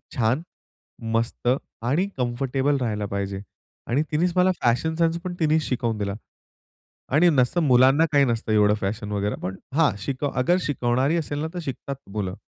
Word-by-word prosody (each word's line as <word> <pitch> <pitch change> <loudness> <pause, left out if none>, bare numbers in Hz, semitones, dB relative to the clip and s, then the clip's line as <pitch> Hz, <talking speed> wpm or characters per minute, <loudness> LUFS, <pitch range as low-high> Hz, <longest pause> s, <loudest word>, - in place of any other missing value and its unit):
छान, 125 +5 +1 0.7
मस्त 115 +1 -1 0.4
आणि 150 +11 +1
कम्फर्टेबल 135 +3 0
राहायला 105 -3 -1
पाहिजे. 100 0 -3 0.5
आणि 135 +6 +1
तिनेच 170 +4 +1
मला 185 +1 +5
फॅशन 125 +7 +1
सेन्स 165 0 +1
पण 180 - -4
तिनेच 155 -1 +3
शिकवून 120 -5 -1
दिला 100 -1 -2 1.0
आणि 175 +3 +6
नसतं 140 +4 +2
मुलांना 130 +5 +5
काही 140 -1 +5
नसतं 115 -3 -1
एवढं 105 -1 +4
फॅशन 105 +2 -3
वगैरे, 100 0 -1
पण 95 +1 -3 0.2
हा 160 -2 +5
शिकव 140 +5 -2
अगर 175 +8 +3
शिकवणारी 135 +3 +1
असेल 145 -2 -3
ना, 160 - -1
तर 180 - -4
शिकतात 135 +1 -5 0.2
मुलं. 100 -3 -3
130 Hz, 160 wpm, -24 LUFS, 110-155 Hz, 1.0 s, आणि